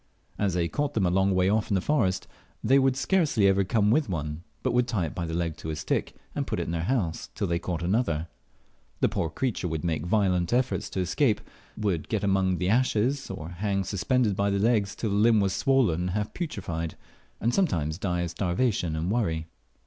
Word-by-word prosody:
As 100 Hz, -4 st, +1 dB
they 85 Hz, -1 st, +1 dB
caught 145 Hz, -, -2 dB
them 100 Hz, -, +2 dB
a 90 Hz, -, +2 dB
long 95 Hz, +1 st, +2 dB
way 90 Hz, 0 st, +3 dB
off 105 Hz, +2 st, +1 dB
in 100 Hz, -, +2 dB
the -, -, +3 dB
forest, 95 Hz, -6 st, +1 dB, 0.4 s
they 135 Hz, +5 st, +5 dB
would 135 Hz, -1 st, +3 dB
scarcely 150 Hz, -, +2 dB
ever 100 Hz, 0 st, +4 dB
come 105 Hz, +1 st, +2 dB
with 145 Hz, -1 st, +2 dB
one, 75 Hz, -2 st, -3 dB, 0.2 s
but 130 Hz, -, +1 dB
would 125 Hz, 0 st, +2 dB
tie 105 Hz, -8 st, 0 dB
it 75 Hz, -, -5 dB
by 85 Hz, -2 st, -3 dB
the 80 Hz, -, -4 dB
leg 85 Hz, -2 st, -1 dB
to 80 Hz, -, -6 dB
a 80 Hz, -, -2 dB
stick, 75 Hz, 0 st, -2 dB, 0.2 s
and -, -, -2 dB
put -, -, -2 dB
it -, -, 0 dB
in -, -, -4 dB
their 85 Hz, 0 st, -2 dB
house 100 Hz, -10 st, -1 dB
till 105 Hz, -, -1 dB
they 85 Hz, -2 st, 0 dB
caught 85 Hz, -2 st, -3 dB
another. 85 Hz, -5 st, 0 dB, 0.7 s
The -, -, +4 dB
poor 80 Hz, -, -1 dB
creature 105 Hz, -, -2 dB
would 80 Hz, -1 st, -3 dB
make 80 Hz, -4 st, 0 dB
violent 90 Hz, -2 st, +2 dB
efforts 125 Hz, +1 st, 0 dB
to 95 Hz, -, -2 dB
escape, 105 Hz, -, +2 dB, 0.4 s
would 100 Hz, -7 st, -1 dB
get 105 Hz, -2 st, -1 dB
among 95 Hz, -2 st, +2 dB
the 90 Hz, -, -1 dB
ashes, 125 Hz, +4 st, +1 dB
or 80 Hz, +2 st, -6 dB
hang 100 Hz, +2 st, -1 dB
suspended 105 Hz, +3 st, +1 dB
by 100 Hz, +1 st, +1 dB
the 100 Hz, -, +1 dB
leg 105 Hz, -1 st, +3 dB
till 105 Hz, +2 st, -3 dB
the -, -, +1 dB
limb 110 Hz, +1 st, +5 dB
was 95 Hz, -1 st, +1 dB
swollen 130 Hz, -12 st, +2 dB
and 90 Hz, +1 st, -1 dB
half 105 Hz, +3 st, -2 dB
putrefied, 85 Hz, -, -4 dB, 0.4 s
and 115 Hz, +3 st, +1 dB
sometimes 85 Hz, -, 0 dB
die 90 Hz, -3 st, -1 dB
of 85 Hz, -1 st, -2 dB
starvation 90 Hz, -1 st, 0 dB
and 80 Hz, +4 st, -1 dB
worry. 85 Hz, -9 st, 0 dB
95 Hz, 220 wpm, -27 LUFS, 85-115 Hz, 0.7 s, they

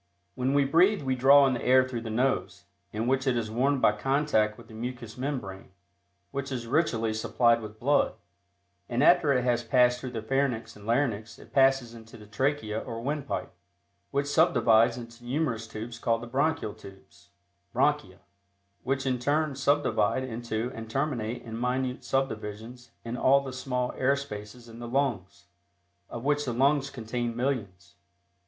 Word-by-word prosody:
When 130 Hz, +5 st, -1 dB
we 140 Hz, -1 st, +4 dB
breathe, 175 Hz, +7 st, +3 dB
we 130 Hz, -1 st, 0 dB
draw 140 Hz, +2 st, +7 dB
in 135 Hz, -, +2 dB
the 120 Hz, -, -3 dB
air 130 Hz, 0 st, +5 dB
through 120 Hz, -3 st, -4 dB
the 115 Hz, -, -6 dB
nose, 125 Hz, +5 st, -1 dB, 0.3 s
in 110 Hz, +2 st, -2 dB
which 130 Hz, +2 st, +1 dB
it 125 Hz, -2 st, +2 dB
is 110 Hz, -2 st, -3 dB
warmed 130 Hz, +4 st, +1 dB
by -, -, +6 dB
contact 110 Hz, -1 st, +1 dB
with -, -, -14 dB
the -, -, -14 dB
mucous 120 Hz, 0 st, -6 dB
membrane, 125 Hz, -9 st, -5 dB, 0.6 s
which 140 Hz, 0 st, -4 dB
is 120 Hz, -3 st, -3 dB
richly 115 Hz, -5 st, +1 dB
supplied 115 Hz, +1 st, +2 dB
with 110 Hz, 0 st, -9 dB
blood, 145 Hz, +4 st, +2 dB, 0.7 s
and 120 Hz, +4 st, +1 dB
after 165 Hz, -2 st, +5 dB
it 125 Hz, -2 st, +2 dB
has 120 Hz, -1 st, +1 dB
passed 125 Hz, +1 st, +3 dB
through 130 Hz, -, -5 dB
the 115 Hz, -3 st, -5 dB
pharynx 120 Hz, -2 st, -1 dB
and 105 Hz, 0 st, -13 dB
larynx 115 Hz, -3 st, 0 dB
it -, -, -16 dB
passes 135 Hz, -3 st, +3 dB
into 115 Hz, -1 st, -12 dB
the 105 Hz, -, -13 dB
trachea 110 Hz, 0 st, -1 dB
or 115 Hz, -1 st, -6 dB
windpipe, 140 Hz, -1 st, -3 dB, 0.6 s
which 140 Hz, 0 st, 0 dB
subdivides 125 Hz, -8 st, +4 dB
into 115 Hz, 0 st, -10 dB
numerous 120 Hz, -3 st, -2 dB
tubes 115 Hz, +1 st, -7 dB
called 115 Hz, 0 st, 0 dB
the -, -, -5 dB
bronchial 135 Hz, -2 st, 0 dB
tubes 85 Hz, -3 st, -16 dB, 0.4 s
(bronchia), -, -, 0 dB, 0.6 s
which 135 Hz, +1 st, -1 dB
in 130 Hz, -2 st, 0 dB
turn 150 Hz, +3 st, +1 dB
subdivide 130 Hz, -4 st, +1 dB
into 120 Hz, -1 st, -3 dB
and 115 Hz, 0 st, -8 dB
terminate 125 Hz, -3 st, -2 dB
in 115 Hz, -2 st, -7 dB
minute 125 Hz, 0 st, -1 dB
subdivisions 120 Hz, -2 st, -3 dB, 0.2 s
in 115 Hz, +1 st, -4 dB
all 135 Hz, +2 st, +4 dB
the 135 Hz, -2 st, -7 dB
small 125 Hz, -1 st, -2 dB
air 135 Hz, +2 st, +2 dB
spaces 120 Hz, -3 st, -8 dB
in 115 Hz, 0 st, -12 dB
the 120 Hz, -, -6 dB
lungs, 115 Hz, -9 st, -2 dB, 0.6 s
of 120 Hz, -, -7 dB
which 145 Hz, +1 st, +1 dB
the 125 Hz, -4 st, -3 dB
lungs 140 Hz, +3 st, +2 dB
contain 120 Hz, -1 st, -4 dB
millions. 115 Hz, -7 st, -3 dB
125 Hz, 170 wpm, -28 LUFS, 115-135 Hz, 0.7 s, draw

